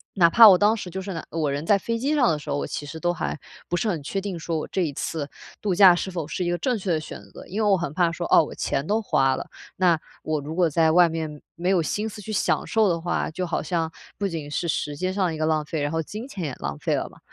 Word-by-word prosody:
哪 170 -3 +6
怕 225 +4 +9
我 185 - +7
当 210 +3 +4
时， 195 -5 -6
就 190 +2 -5
是 195 0 -5
哪 165 - -6
我 155 -3 0
人 145 +3 -3
在 205 +1 +4
飞 230 +3 -2
机 275 +6 0
上 255 -5 +4
的 155 - +1
时 - - -10
候， - - 0
我 - - -2
其 145 - -5
实 160 +2 -7
都 175 +1 +1
还 155 - -3 0.3
不 175 - 0
是 220 - -1
很 165 -8 -2
确 195 - -2
定 195 -3 -4
说 165 0 -3
我 - - -5
这 190 - 0
一 155 - -1
次 145 +1 -3 0.3
度 200 -3 0
假 185 -2 +8
是 190 +2 -3
否 165 -4 -4
是 180 - -3
一 175 - 0
个 175 - 0
正 245 +6 0
确 190 -2 -2
的 160 - +2
选 155 - -8
择。 - - -11
因 215 +4 -2
为 210 - +3
我 190 - +5
很 165 -4 -4
怕 170 -1 +2
说， 170 0 -4
哦， - - +7
我 - - -7
钱 140 +2 -1
都 215 +4 +1
花 135 -9 +2
了， - - -6 0.3
那 180 -3 +4 0.3
我 155 -1 -1
如 155 +3 -6
果 175 -2 +3
在 160 +1 +3
外 175 +1 +6
面 160 -2 -5
没 175 +2 -1
有 185 -3 +3
心 210 +7 -2
思 210 - -9
去 215 +2 -6
享 - - +1
受 220 -4 +3
的 170 -1 0
话， 175 +1 -1
就 180 +2 -3
好 170 - -2
像 165 0 -1 0.3
不 200 - -1
仅 155 -5 -5
是 170 - -2
时 150 -2 -2
间 185 +4 -1
上 195 -1 +1
的 170 - -1
一 - - -5
个 155 - 0
浪 155 -1 +1
费， 150 0 -4
然 145 - 0
后， 165 0 0
金 215 - -7
钱 195 -10 -6
也 140 - -3
浪 70 0 -4
费 - - 0
了 - - -2
嘛。 - - -19
170 Hz, 330 characters per minute, -24 LUFS, 155-195 Hz, 0.3 s, 怕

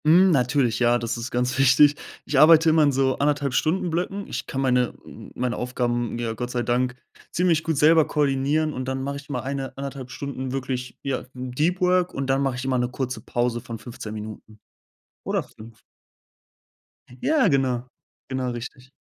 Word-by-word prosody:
Hm, 180 +4 +6
natürlich, 125 -4 +2
ja, 120 0 +4
das 115 -1 -3
ist 120 +1 -5
ganz 125 0 -1
wichtig. 135 +2 +6 0.3
Ich 140 - +1
arbeite 160 +1 +7
immer 160 0 +4
in 145 - +4
so 135 0 +1
1,5- 145 -2 +1
Stunden-Blöcken. 180 +4 -1
Ich - - -5
kann 135 - -4
meine 125 -2 +2
m - - -11
m - - -28
meine 125 -1 -2
Aufgaben 120 -1 -1
mir 115 -1 -2
Gott 120 +2 -4
sei 125 -1 -1
Dank 125 +1 0 0.4
ziemlich 170 -3 +2
gut 160 -3 -1
selber 155 +2 +5
koordinieren 145 +2 +1
und 130 - -4
dann 130 0 -3
mache 140 +1 -3
ich 140 +1 -12
mal 125 -4 -2
1, 135 0 -5
1,5 135 -2 -6
Stunden 130 -1 -5
wirklich, 130 -1 -4
ja, 135 -2 -2
mm, 125 0 -6
Deep 165 +8 0
Work 180 0 +2
und 135 0 -2
dann 135 +1 +2
mache 135 -2 0
ich 125 +1 -5
immer 130 -1 +1
'ne 125 0 0
kurze 125 -2 -4
Pause 120 +1 -1
von 115 0 -7
15 110 -2 -8
Minuten, 110 0 -9 0.6
oder - - -1
5. 110 0 -15 1.4
Ja, 305 -7 +3
genau. 130 -5 +1 0.4
Genau, 130 -1 -2
richtig. 125 +2 -8
130 Hz, 185 wpm, -24 LUFS, 125-145 Hz, 1.4 s, arbeite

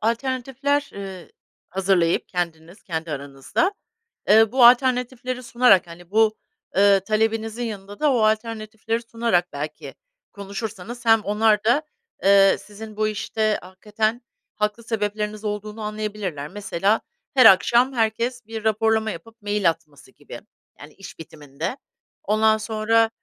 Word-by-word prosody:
alternatifler, 265 +5 -1
ııı, 190 -3 -8 0.4
hazırlayıp 185 -3 +1
kendiniz, 170 +1 -5
kendi 165 -2 -5
aranızda, 140 - -2 0.6
eee, 220 0 +6
bu 250 -1 +5
alternatifleri 250 0 +2
sunarak, 235 -8 +4
hani, 175 +2 -13
bu, 220 0 +3 0.4
ııı, 200 -1 +6
talebinizin 220 +3 -1
yanında 205 -3 -7
da 300 -2 +3
o 245 - +2
alternatifleri 220 +1 -1
sunarak 230 -6 -1
belki 150 +2 -6 0.4
konuşursanız, 205 +3 -7
hem 225 -1 +5
onlar 210 0 +2
da, 240 +7 +3 0.4
eee, 195 0 +6
sizin 215 +1 -11
bu 215 - +1
işte 215 0 -1
hakikaten 215 +5 -3 0.3
haklı 210 +2 -2
sebepleriniz 210 -1 -3
olduğunu 210 +1 -5
anlayabilirler. 210 -8 -4
Mesela, 205 +2 -1 0.3
her 260 -2 +6
akşam 235 +7 +6
herkes 235 +2 -1
bir 220 0 -7
raporlama 220 0 +1
yapıp 225 -1 -11
mail 205 -3 +1
atması 160 -4 -8
gibi, - - -11 0.4
yani, 150 +1 -12
iş 195 - -12
bitiminde. 150 - -6 0.5
Ondan 220 +1 +3
sonra, 220 +1 +1
215 Hz, 125 wpm, -23 LUFS, 195-230 Hz, 0.6 s, eee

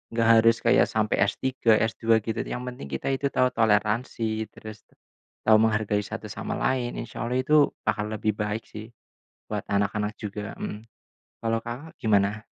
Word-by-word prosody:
nggak 115 -1 +2
harus 115 0 +4
kayak - - +4
sampai 110 -1 0
S-3, 115 +2 +2
S-2 115 0 +2
gitu, 110 0 -2
yang 125 - -4
penting 125 - -7
kita 65 - -4
itu 135 +1 0
tahu 130 - +3
toleransi, 110 0 +1
terus 110 -1 -10 0.6
tahu 110 -1 +6
menghargai 105 -2 +2
satu - - -7
sama - - -4
lain, 125 -2 -1
insyaallah 120 +1 -4
itu 150 +1 +5 0.2
akan 105 +1 -1
lebih 110 0 0
baik 105 +1 -2
sih, 110 +1 -9 0.7
buat - - -2
anak-anak 105 +1 0
juga. 105 -1 -6
Mhm. 105 +2 -6 0.6
Kalau 115 0 +1
Kakak 130 +8 -7
gimana? 105 -1 +2
110 Hz, 155 wpm, -26 LUFS, 105-120 Hz, 0.7 s, tahu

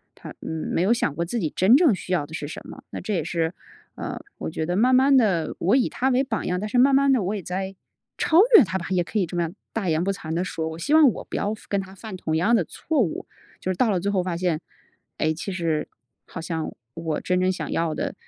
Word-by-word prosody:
她， - - -10
嗯， 160 -1 -4
没 - - +1
有 190 +5 +3
想 160 -11 -1
过 170 - -1
自 210 +8 -2
己 165 -7 -1
真 205 +8 +6
正 300 - +4
需 185 - -8
要 175 -5 +1
的 150 - -13
是 145 -2 -4
什 - - -6
么。 - - -11
那 - - -6
这 210 +4 -3
也 170 -5 0
是， 165 +1 -1 0.4
呃， - - -5 0.2
我 - - -3
觉 160 0 -3
得 175 +2 -1
慢 245 +6 +4
慢 270 +2 +5
地 195 -10 +2
我 195 +7 +3
以 255 - +2
她 260 - 0
为 260 +1 +2
榜 220 -6 -3
样， 180 0 -1
但 210 - -3
是 215 - -1
慢 270 +3 +6
慢 275 0 +5
地 245 -6 +2
我 190 +3 -1
也 200 - -4
在 190 +2 -4 0.4
超 320 - +2 0.2
越 270 - +7
她 190 0 -2
吧， 170 - -6
也 185 -2 +2
可 215 - -4
以 195 - +2
这 175 - -8
么 - - +2
样 170 +2 -3 0.2
大 215 -4 -2
言 160 +1 +1
不 195 - +1
惭 165 -5 -6
地 170 +2 0
说， 160 -3 -3
我 160 - -7
希 280 - -1
望 310 -3 +8
我 - - -7
不 - - -7
要 205 - 0
犯 - - -18
跟 200 -1 +1
她 190 0 -11
犯 215 0 -8
同 160 -3 -2
样 205 +9 +3
的 210 - +3
错 310 - -2
误， 180 -8 -2 0.3
就 185 - -2
是 - - -2
到 230 +5 +2
了 190 -4 +1
最 200 +3 -1
后 190 -2 +1
发 180 -2 -3
现， 175 -3 0 0.6
诶， 155 0 +1
其 170 +5 -5
实 165 -4 -1 0.4
好 - - -7
像 160 -1 -3 0.2
我 160 -1 -3
真 180 0 +1
正 185 0 +2
想 185 - -5
要 165 -2 0
的， 285 -1 -3
185 Hz, 300 characters per minute, -24 LUFS, 165-225 Hz, 0.6 s, 望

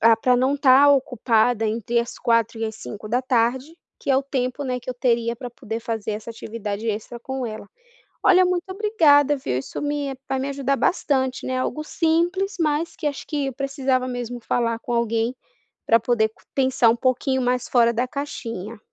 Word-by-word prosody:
ah, 230 0 +6
pra 250 +2 +2
não 260 +3 +2
estar 275 0 +6
ocupada 245 -4 +2
entre 230 +2 -1
as 235 - -6
16h 230 -1 +1
e 225 - -1
as 220 -1 -4
17h 215 -1 -8
da 245 +4 +1
tarde, 255 +5 0 0.2
que - - -2
é 265 - +5
o 270 - +2
tempo, 265 0 -2
né, 250 -1 -2
que 255 - -6
eu - - -5
teria 235 -1 +1
pra 245 0 -6
poder 230 -2 -6
fazer 220 -2 -3
essa 215 +2 -6
atividade 220 -1 -5
extra 220 +3 -4
com 265 +1 -4
ela. 215 -2 -7 0.5
Olha, 370 0 +6
muito 360 -1 0
obrigada, 315 -9 +4
viu. 130 - -2
Isso 135 - -6
me 290 -2 -2
vai 265 - 0
me 270 +2 -2
ajudar 275 0 0
bastante, 265 -6 0
né, 255 0 -1
algo 305 +4 -2
simples, 345 +5 0
mas 310 +1 0
que - - -4
acho 285 - -6
que 290 -3 -2
eu 270 - -3
precisava 270 -1 -1
mesmo 245 -1 -4
falar 230 -1 0
com 240 - -6
alguém 235 +1 0 0.5
pra 230 0 +5
poder 220 -2 +1 0.2
pensar 260 -3 +3
um 225 - +3
pouquinho 260 +2 0
mais 250 0 0
fora 235 -2 +4
da 245 +2 0
caixinha. 230 -7 -6
250 Hz, 195 wpm, -23 LUFS, 230-275 Hz, 0.5 s, ah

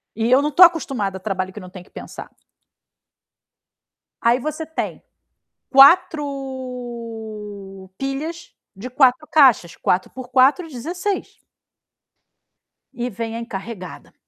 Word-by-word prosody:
E 225 +2 -1
eu 260 +2 +6
não 295 - 0
estou 350 +5 +8
acostumada 265 - -1
a - - -11
trabalho 190 -1 -3
que 210 - -9
não 185 -2 -11
tem 180 -1 -11
que - - -24
pensar. - - -10 1.9
Aí 235 +2 +3
você 310 +4 -4
tem, 320 +1 -5 0.7
4 240 - +1
pilhas 300 +6 -5 0.2
de 215 +6 -7
4 260 +3 +3
caixa. 260 - +5
4 180 +1 0
por 260 -1 -9
4, 270 +7 +3
16. 350 - -4 1.5
E 245 +1 -3
vem 225 0 -5
a - - -4
encarregada: 205 -4 -8
250 Hz, 120 wpm, -21 LUFS, 210-280 Hz, 1.9 s, estou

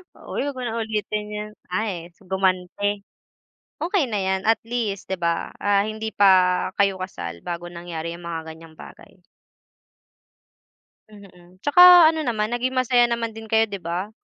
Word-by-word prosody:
Uy - - -5
huwag 285 - -4
mo - - -5
na 230 -1 -3
ulitin 215 -1 -3
'yun. 210 0 -5 0.2
Ay 180 -4 -3
gumante. 190 +2 -1 0.8
Okey 350 -2 +1
na 215 -5 -2
'yan 190 0 0
at 225 +1 +3
least 220 -6 -3
'di 190 - -2
ba, 170 -1 -1
ah, 200 -1 +2
hindi 220 0 -5
pa 185 -2 +4
kayo 195 -2 +1
kasal 85 - -6
bago 175 0 -5
nangyari 170 -1 -6
'yung 170 0 -11
mga 160 -1 -5
ganiyang 160 -1 -16
bagay. 185 - -14 1.9
Mm, 185 -3 -17
'tsaka 355 +3 +9
ano 320 - -4
naman, 220 -5 -1
naging 255 +2 -1
masaya 245 -1 +3
naman 230 -1 -2
din 225 0 -10
kayo 225 0 +4
'di 200 -2 -7
ba, 175 +5 -4
205 Hz, 155 wpm, -23 LUFS, 180-225 Hz, 1.9 s, tsaka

